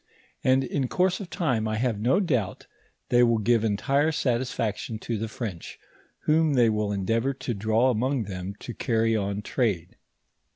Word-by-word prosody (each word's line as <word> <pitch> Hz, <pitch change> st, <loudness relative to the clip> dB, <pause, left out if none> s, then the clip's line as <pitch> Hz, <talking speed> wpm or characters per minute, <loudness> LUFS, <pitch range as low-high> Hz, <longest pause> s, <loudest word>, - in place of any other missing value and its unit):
And 130 Hz, +1 st, +4 dB
in 130 Hz, +1 st, -1 dB
course 180 Hz, +6 st, +1 dB
of 195 Hz, -4 st, -7 dB
time 125 Hz, -13 st, 0 dB
I 110 Hz, -, -1 dB
have 115 Hz, -2 st, 0 dB
no 125 Hz, -, +3 dB
doubt 130 Hz, -, -1 dB, 0.4 s
they 120 Hz, -, +5 dB
will 115 Hz, -1 st, +4 dB
give 115 Hz, +1 st, +2 dB
entire 125 Hz, +9 st, +1 dB
satis 125 Hz, -4 st, 0 dB
faction 110 Hz, 0 st, -3 dB
to 115 Hz, +1 st, -4 dB
the 110 Hz, +1 st, -3 dB
French, 110 Hz, -6 st, -6 dB, 0.4 s
whom 155 Hz, 0 st, +3 dB
they 120 Hz, -3 st, +4 dB
will 105 Hz, -1 st, -1 dB
endeavor 115 Hz, +7 st, 0 dB
to 125 Hz, -, -3 dB
draw 110 Hz, +5 st, +2 dB
among 125 Hz, +2 st, 0 dB
them 95 Hz, -1 st, -6 dB
to 120 Hz, -, -6 dB
carry 115 Hz, 0 st, +1 dB
on 100 Hz, 0 st, -2 dB
trade. 100 Hz, -9 st, -1 dB
115 Hz, 170 wpm, -26 LUFS, 105-130 Hz, 0.4 s, they